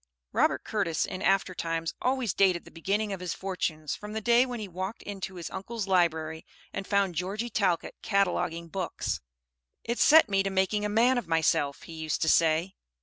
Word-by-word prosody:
Robert - - +2
Curtis 195 -7 0
in 185 - -6
after 195 -1 +2
times 165 -1 -2
always 255 -6 0
dated 185 -3 +3
the - - -13
beginning 200 +5 -1
of 190 - -5
his 180 -1 -3
fortunes 165 -5 -3
from 210 0 -8
the 220 - -1
day 235 +4 +4
when 245 -2 -5
he 210 - -5
walked 190 +4 -5
into 195 -2 -6
his 175 -2 -6
uncle's 215 +2 -4
library 160 -4 +1 0.3
and 195 - -4
found 200 -3 +2
Georgie 200 +8 -3
Talcott 185 -6 0
cataloguing 180 -4 0
books. 185 +1 -3 0.6
"It 235 +1 -2
set 320 -2 +7
me 195 -2 +2
to 195 - -1
making 195 +2 +1
a - - 0
man 240 +4 +4
of 235 - -8
myself," 160 -3 +1
he 165 - -10
used 160 -1 -2
to 160 - +2
say. 165 +4 +3
190 Hz, 190 wpm, -28 LUFS, 170-210 Hz, 0.6 s, set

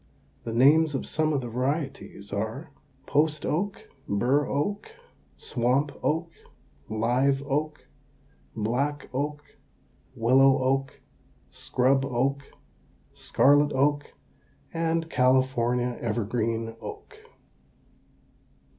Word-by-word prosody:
The 115 - -3
names 145 +6 +4
of - - -3
some 155 0 0
of 140 -3 0
the 120 - -5
varieties 125 -5 -4
are: 110 +10 -4 0.3
Post 150 0 +1
oak, 195 +6 -2 0.2
burr 125 +9 +2
oak, 200 +9 -2 0.5
swamp 130 +4 0
oak, 165 +2 -1 0.6
live 125 +5 +1
oak, 150 +2 -2 0.7
black 135 +7 -2
oak, 145 +2 -3 0.7
willow 135 +4 +5
oak, 135 +1 -1 0.5
scrub 135 +2 +1
oak, 135 +2 0 0.7
scarlet 145 +1 +3
oak, 145 +2 0 0.6
and 165 0 0
California 125 -3 +1
evergreen 115 0 -2
oak. 425 +1 -9
135 Hz, 90 wpm, -26 LUFS, 120-150 Hz, 0.7 s, willow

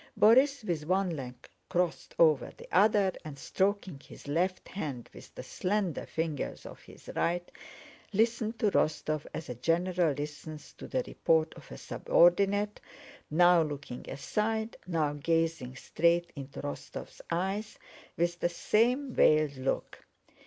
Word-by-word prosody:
Borís, 260 +4 +5
with 155 -5 -2
one 185 0 +2
leg 125 -3 -6 0.3
crossed 180 -2 -1
over 155 -5 +4
the - - -12
other 200 +1 +4
and 150 -2 -8
stroking 190 0 -1
his - - -13
left 180 +6 0
hand 145 -10 -5
with - - -14
the - - -7
slender 190 -4 -2
fingers 160 -3 -3
of - - -10
his - - -16
right, 175 +1 -1 0.6
listened 225 +1 +1
to 215 -2 +2
Rostóv 155 -2 0
as 160 - -6
a 125 - -4
general 165 +4 +1
listens 150 +1 -7
to - - -10
the 260 -1 -1
report 160 -7 +1
of - - -14
a - - -7
subordinate, 200 +4 +2 0.5
now 175 +2 +5
looking 145 -5 -5
aside 220 +8 -2
and 180 - -7
now 150 -2 +1
gazing 160 -3 -1
straight 170 +5 +1
into 140 -1 -8
Rostóv's 145 - -7
eyes 195 +5 -2 0.4
with 175 +1 0
the 175 - +1
same 245 +9 +1
veiled 155 -2 +4
look. 130 +1 -3
170 Hz, 140 wpm, -30 LUFS, 150-200 Hz, 0.6 s, Borís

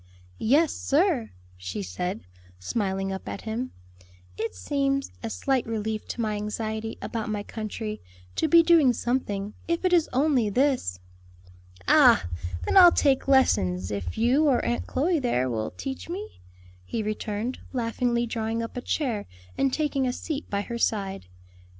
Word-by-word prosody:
"Yes, 290 +7 +3
sir," 295 - +1 0.3
she 90 +2 -5
said, 180 - -4 0.4
smiling 195 - -2
up 190 - -6
at - - -5
him, 230 +3 -4 0.6
"it 225 - -3
seems 275 -1 -1
a 230 - -4
slight 265 +2 0
relief 220 -1 -3
to 240 - -4
my 215 -2 -1
anxiety 220 +1 -4
about 225 -2 -3
my 210 -1 -2
country, 215 0 -5 0.3
to - - +1
be 335 +2 +7
doing 325 -7 +5
something, 210 -5 -2
if 335 +2 -1
it 365 - +3
is 335 -3 +4
only 260 -4 +2
this." 250 - +1 0.9
"Ah! - - +6 0.4
then - - +2
I'll 355 -2 +10
take 275 -5 +2
lessons, 90 - +3
if 95 -4 -4
you, 265 +7 +3
or 260 -4 +2
Aunt 240 - -1
Chloe 325 +4 +1
there 130 - +1
will 110 -2 -2
teach 270 +3 -6
me," 395 +5 -7 0.4
he 220 - -3
returned, 215 +3 -3
laughingly 240 -1 0
drawing 225 0 -2
up 230 - -7
a 245 - -3
chair 240 -8 -2 0.3
and 275 - +1
taking 280 -2 0
a 250 - 0
seat 305 +2 -5
by 200 0 0
her 235 +3 -5
side. 195 - -1
235 Hz, 155 wpm, -26 LUFS, 210-275 Hz, 0.9 s, I'll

